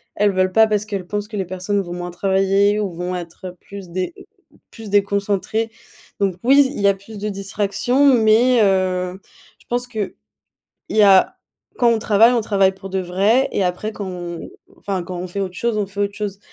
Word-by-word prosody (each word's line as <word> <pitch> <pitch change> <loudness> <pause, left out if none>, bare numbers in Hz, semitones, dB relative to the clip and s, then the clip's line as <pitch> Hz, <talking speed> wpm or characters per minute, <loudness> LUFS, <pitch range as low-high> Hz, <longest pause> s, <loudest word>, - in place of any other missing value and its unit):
elles 205 -1 +2
veulent 185 0 +1
pas 220 +2 +6
parce 210 -1 0
qu'elles 200 -4 -4
pensent 205 +1 -3
que 210 -1 -7
les 190 - -1
personnes 185 +3 -2
vont 175 -2 -7
moins 175 0 -5
travailler 195 +3 +2
ou 205 -3 -2
vont 180 +2 -4
être, 175 +1 -7
heu, 180 - -9
plus 195 -2 -10
dé 185 - -3 0.6
plus 225 -2 -10
déconcentrées. 200 +2 0 0.5
Donc, 195 -3 +1
oui 275 +2 +5
il - - -5
y 200 - +4
a 200 - +5
plus 200 +3 -12
de 205 +1 -4
distractions, 205 +7 0
mais, 235 +2 +4
heu, 185 -1 0 0.4
je - - -24
pense 245 +1 -2
qu'il 215 -5 -4 0.8
y 215 - +3
a, 195 - +5 0.4
quand 240 - +3
on 230 - +1
travaille, 220 +2 +4
on 240 - +2
travaille 195 -3 +2
pour 195 0 -10
de 190 - -1
vrai 195 +8 +2
et 200 - 0
après 180 +5 -2
quand 205 -2 -6
on 175 -2 -6 0.3
enfin, 195 -3 -3
quand 180 0 -6
on 180 - -4
fait 200 +3 -4
autre 185 -2 -3
chose, 235 -2 -1
on 210 -1 0
fait 200 +1 -7
autre 200 0 -1
chose. 205 -2 -4
200 Hz, 205 wpm, -20 LUFS, 185-215 Hz, 0.8 s, pas